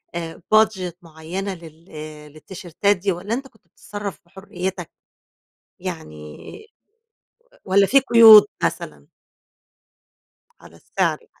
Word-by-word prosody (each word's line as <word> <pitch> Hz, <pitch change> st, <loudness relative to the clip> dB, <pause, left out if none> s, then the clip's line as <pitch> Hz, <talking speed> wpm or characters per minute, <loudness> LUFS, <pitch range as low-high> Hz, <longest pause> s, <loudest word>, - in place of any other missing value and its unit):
آآ، 165 Hz, 0 st, -6 dB
budget 190 Hz, -5 st, +2 dB
معيّنة 170 Hz, +4 st, -7 dB
لل 165 Hz, 0 st, -15 dB
آآ، 150 Hz, -1 st, -10 dB
للتيشيرتات 175 Hz, +5 st, -3 dB
دي 195 Hz, +2 st, -2 dB
والَّا 185 Hz, +5 st, -5 dB
أنت 270 Hz, +3 st, -4 dB
كنت 220 Hz, -7 st, -29 dB
بتتصرف 205 Hz, +3 st, -8 dB
بحريتك؟ 185 Hz, -1 st, -7 dB, 0.9 s
يعني 75 Hz, -1 st, -8 dB, 1.3 s
والَّا 195 Hz, +1 st, +3 dB
في 275 Hz, +7 st, +4 dB
قيود 225 Hz, -4 st, +8 dB, 0.2 s
مثلًا؟ -, -, -4 dB, 1.5 s
على -, -, -17 dB
السعر -, -, -2 dB
يعني. 460 Hz, -, -31 dB
185 Hz, 105 wpm, -21 LUFS, 165-205 Hz, 1.5 s, قيود